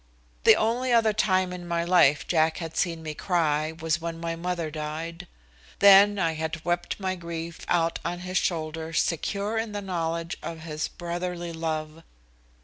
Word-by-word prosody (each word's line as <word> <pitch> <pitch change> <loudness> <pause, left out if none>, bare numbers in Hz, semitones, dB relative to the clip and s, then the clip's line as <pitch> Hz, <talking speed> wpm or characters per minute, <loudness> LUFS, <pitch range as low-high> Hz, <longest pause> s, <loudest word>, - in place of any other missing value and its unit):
The - - +9
only 240 +3 0
other 225 -2 +4
time 185 -3 +1
in 175 -1 -7
my 170 0 0
life 170 -5 +4
Jack 160 -1 +2
had 165 -2 -6
seen 165 -3 -1
me 155 -1 -4
cry 155 -3 0
was 160 0 -2
when 165 0 -4
my 165 0 -3
mother 170 -2 -3
died. 155 +2 -5 0.5
Then 200 +1 +7
I 165 -4 +1
had 160 +1 -4
wept 175 +2 -1
my 190 -1 -1
grief 170 -1 -6
out 165 -1 +1
on 175 0 -3
his 185 0 -2
shoulder 160 -2 -2
secure 200 +7 0
in 225 -1 -3
the 205 - -2
knowledge 170 -3 -3
of 165 -1 -6
his 155 -1 -3
brotherly 175 0 -4
love. 160 -1 -3
170 Hz, 165 wpm, -26 LUFS, 160-180 Hz, 0.5 s, The